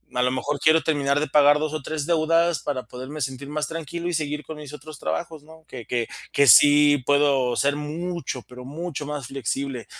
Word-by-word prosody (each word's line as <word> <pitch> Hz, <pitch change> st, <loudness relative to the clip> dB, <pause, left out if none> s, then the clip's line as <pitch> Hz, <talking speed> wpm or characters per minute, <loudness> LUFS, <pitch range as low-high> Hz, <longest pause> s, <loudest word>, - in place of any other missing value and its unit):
a 125 Hz, -, +1 dB
lo 125 Hz, -, +1 dB
mejor 140 Hz, +3 st, -2 dB
quiero 155 Hz, +1 st, +5 dB
terminar 145 Hz, -2 st, +1 dB
de 155 Hz, -, -1 dB
pagar 145 Hz, +1 st, +5 dB
2 155 Hz, 0 st, -2 dB
o 155 Hz, -, -3 dB
3 150 Hz, +1 st, -4 dB
deudas 165 Hz, 0 st, +2 dB
para 135 Hz, -3 st, -3 dB
poderme 130 Hz, +5 st, -8 dB
sentir 135 Hz, +1 st, -4 dB
más 150 Hz, 0 st, -2 dB
tranquilo 165 Hz, +1 st, -5 dB
y -, -, -3 dB
seguir 150 Hz, -1 st, -2 dB
con 160 Hz, -, -7 dB
mis 150 Hz, -2 st, -9 dB
otros 150 Hz, 0 st, -10 dB
trabajos, 160 Hz, -3 st, -4 dB
¿no?, 160 Hz, +1 st, -17 dB
que 120 Hz, -3 st, -9 dB
que 120 Hz, -2 st, -2 dB, 0.3 s
que 140 Hz, -1 st, +4 dB
sí 145 Hz, +3 st, +7 dB
puedo 140 Hz, -4 st, +2 dB
ser 140 Hz, 0 st, +2 dB
mucho, 155 Hz, -2 st, -5 dB
pero 125 Hz, 0 st, -11 dB
mucho 150 Hz, +1 st, -6 dB
más 145 Hz, -4 st, -5 dB
flexible, 135 Hz, -1 st, -4 dB
145 Hz, 205 wpm, -23 LUFS, 135-155 Hz, 0.3 s, sí